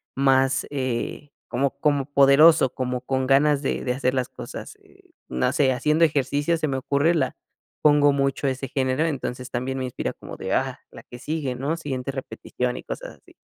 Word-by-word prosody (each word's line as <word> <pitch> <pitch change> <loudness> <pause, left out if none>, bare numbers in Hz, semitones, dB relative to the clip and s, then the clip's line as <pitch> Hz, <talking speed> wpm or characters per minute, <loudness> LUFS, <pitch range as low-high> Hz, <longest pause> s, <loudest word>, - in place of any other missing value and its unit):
más, 135 0 +3
eh, 130 +1 -3 0.2
como 135 +3 0
como 145 -2 +1
poderoso, 140 0 +6
como 125 -1 -3
con 130 0 -1
ganas 140 +1 +4
de 140 - -2
de 125 - +1
hacer 130 0 0
las 130 -1 0
cosas, - - -9
eh, - - -24 0.2
no 65 0 0
sé, 135 -2 +3
haciendo 150 +6 +2
ejercicio 145 +1 +1
se 155 - -1
me 135 -2 -1
ocurre, 140 +5 +1
la 165 - -1 0.4
pongo 145 -1 +5
mucho 140 0 0
ese 135 0 -2
género, 130 +3 0
entonces 125 -4 -4
también 130 +2 -2
me 130 - -2
inspira 125 - -3
como - - -10
de: - - -3
"Ah, - - -1
la - - -12
que 120 - -12
sigue, 150 -2 -3
¿no?, 140 +6 -2
siguiente 135 -5 -4
repetición", 125 -2 -4
y - - -8
cosas - - -7
así. - - -22
135 Hz, 185 wpm, -24 LUFS, 130-145 Hz, 0.4 s, poderoso